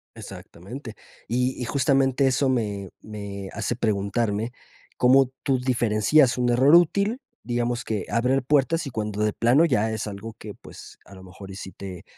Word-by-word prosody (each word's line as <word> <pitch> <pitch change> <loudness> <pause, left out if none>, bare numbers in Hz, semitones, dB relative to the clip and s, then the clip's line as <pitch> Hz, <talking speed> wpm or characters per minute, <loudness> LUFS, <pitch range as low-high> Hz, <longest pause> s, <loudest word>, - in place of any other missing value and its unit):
Exactamente. 110 - -10 0.3
Y 125 +3 -1
y - - -2
justamente 135 +1 +2
eso 130 +1 +1
me 100 -6 -2
me 100 -2 -7
hace 120 - -2
preguntarme, 110 +1 -1 0.5
¿cómo 130 +1 +4
tú 135 -2 +1
diferencias 125 +2 +2
un 125 -1 +1
error 135 +7 +5
útil? 200 - +3 0.2
Digamos 120 0 -2
que 105 -4 -3
abrir 125 +3 +1
puertas 150 +4 +1
y - - -4
cuando 105 -2 -3
de 105 - +1
plano 130 +8 +4
ya 110 -7 +1
es 110 -1 -4
algo 105 +2 -7
que 105 -1 -9
pues - - -14
a 100 - -14
lo 95 - -13
mejor 95 +1 -12
y - - -9
si 95 -1 -8
te 95 -3 -9
120 Hz, 170 wpm, -24 LUFS, 105-130 Hz, 0.5 s, error